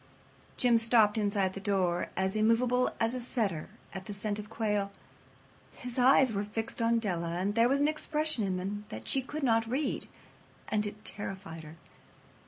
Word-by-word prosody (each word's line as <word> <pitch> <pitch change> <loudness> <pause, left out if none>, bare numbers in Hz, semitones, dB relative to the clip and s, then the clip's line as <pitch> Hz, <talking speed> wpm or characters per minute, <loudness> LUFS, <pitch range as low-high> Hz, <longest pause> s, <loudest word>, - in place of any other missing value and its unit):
Jim 240 -2 +4
stopped 225 -2 +4
inside 200 -3 +1
the 195 - -6
door, 190 -4 0
as 190 +2 0
immovable 235 +3 +3
as 225 +1 +1
a 255 - -3
setter 215 - -1 0.2
at 190 0 -6
the 205 - -5
scent 205 +1 -2
of 210 0 -8
quail. 210 -3 -1 0.8
His 250 0 -5
eyes 260 -1 +5
were 200 0 -1
fixed 225 +3 -4
upon 230 0 +3
Della, 175 -6 -1
and 195 +3 0
there 230 +2 +4
was 275 +1 +2
an 290 - +4
expression 305 -4 0
in 190 -2 -1
them 205 +3 -4
that 110 +1 -8
she 270 - +1
could 290 +3 -6
not 225 -3 +2
read, 275 +4 -1 0.6
and 210 -1 0
it 210 +1 -9
terrified 190 -5 -3
her. 155 +1 -11
215 Hz, 180 wpm, -31 LUFS, 195-240 Hz, 0.8 s, eyes